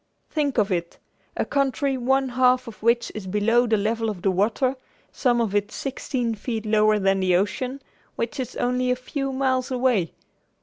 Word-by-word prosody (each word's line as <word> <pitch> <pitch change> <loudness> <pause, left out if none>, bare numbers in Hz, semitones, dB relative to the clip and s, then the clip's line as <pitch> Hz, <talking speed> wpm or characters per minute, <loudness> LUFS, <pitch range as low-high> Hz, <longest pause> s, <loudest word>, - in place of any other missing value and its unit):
Think 290 -4 0
of 210 -2 +2
it! 170 -2 -2 0.4
A - - 0
country 275 0 0
one 265 +1 +1
half 255 0 +3
of 225 - -10
which 235 +2 +2
is 210 -3 -6
below 225 +5 +2
the 220 -1 +3
level 225 +2 0
of 190 -4 -6
the 195 - +3
water, 225 +8 +1 0.4
some 245 -3 +1
of 225 -4 0
it 205 +1 0
sixteen 250 -3 -3
feet 220 +1 -4
lower 215 0 +3
than 195 -1 +2
the 185 -1 +2
ocean, 250 +8 -1 0.3
which 230 +5 -3
is 255 - -4
only 250 +1 0
a 250 - +3
few 275 +2 -4
miles 260 -1 0
away! 245 -9 +1
240 Hz, 180 wpm, -24 LUFS, 210-260 Hz, 0.4 s, half